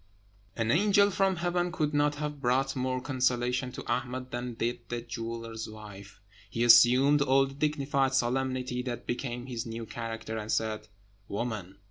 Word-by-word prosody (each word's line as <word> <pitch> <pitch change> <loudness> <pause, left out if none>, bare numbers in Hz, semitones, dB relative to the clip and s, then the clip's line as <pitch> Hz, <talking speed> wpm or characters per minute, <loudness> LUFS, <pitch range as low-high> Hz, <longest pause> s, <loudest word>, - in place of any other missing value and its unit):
An 115 -1 0
angel 200 +4 +4
from 195 0 +2
heaven 175 +1 0
could 155 -4 -1
not 145 0 +2
have 150 -1 -4
brought 135 +2 +1
more 130 0 -1
consolation 125 -1 0
to - - -7
Ahmed 130 0 -3
than 120 0 -4
did 120 +2 -1
the 120 0 -3
jeweller's 115 -1 -6
wife. 105 -2 -11 0.3
He 115 - -1
assumed 130 +4 +7
all 135 -1 +4
the 135 - -8
dignified 140 -2 0
solemnity 130 0 0
that 125 -1 -5
became 120 0 -3
his 120 -3 -5
new 115 0 -5
character, 115 0 -5
and 105 +1 -4
said, 110 -1 -1 0.4
"Woman! 100 -3 -4
125 Hz, 155 wpm, -29 LUFS, 115-135 Hz, 0.4 s, assumed